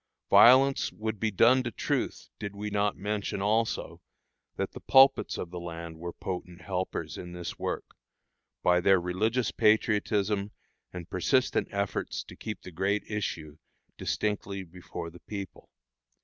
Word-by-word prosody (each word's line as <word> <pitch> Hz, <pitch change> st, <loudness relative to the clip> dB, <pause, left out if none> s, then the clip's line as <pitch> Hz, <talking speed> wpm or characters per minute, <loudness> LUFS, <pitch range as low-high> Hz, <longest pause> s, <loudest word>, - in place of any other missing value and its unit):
Violence 135 Hz, +3 st, +7 dB
would 110 Hz, -1 st, -4 dB
be 110 Hz, -, +1 dB
done 120 Hz, +6 st, +5 dB
to 120 Hz, -, -3 dB
truth -, -, -2 dB
did 100 Hz, -1 st, -5 dB
we 105 Hz, +1 st, -4 dB
not 105 Hz, 0 st, +1 dB
mention, 105 Hz, +1 st, -2 dB
also, 110 Hz, +3 st, 0 dB, 0.5 s
that -, -, -2 dB
the -, -, -9 dB
pulpits 135 Hz, +1 st, +5 dB
of 85 Hz, -, -5 dB
the 90 Hz, -, -5 dB
land 85 Hz, -1 st, -7 dB
were 85 Hz, +1 st, -5 dB
potent 90 Hz, -1 st, -6 dB
helpers 95 Hz, -1 st, -3 dB
in 90 Hz, -1 st, -8 dB
this 90 Hz, -1 st, -6 dB
work, -, -, -4 dB, 0.7 s
by 90 Hz, 0 st, +4 dB
their 95 Hz, +1 st, +5 dB
religious 105 Hz, +7 st, 0 dB
patriotism 105 Hz, -1 st, +2 dB, 0.4 s
and 90 Hz, -2 st, -7 dB
persistent 130 Hz, +8 st, +1 dB
efforts 100 Hz, 0 st, -2 dB
to -, -, -12 dB
keep 110 Hz, -, -6 dB
the 95 Hz, -, -9 dB
great 95 Hz, +5 st, 0 dB
issue 80 Hz, -7 st, -4 dB, 0.4 s
distinctly 100 Hz, -2 st, -2 dB
before 85 Hz, -1 st, -8 dB
the 90 Hz, -, -13 dB
people. 100 Hz, -2 st, -7 dB
100 Hz, 145 wpm, -29 LUFS, 90-105 Hz, 0.7 s, Violence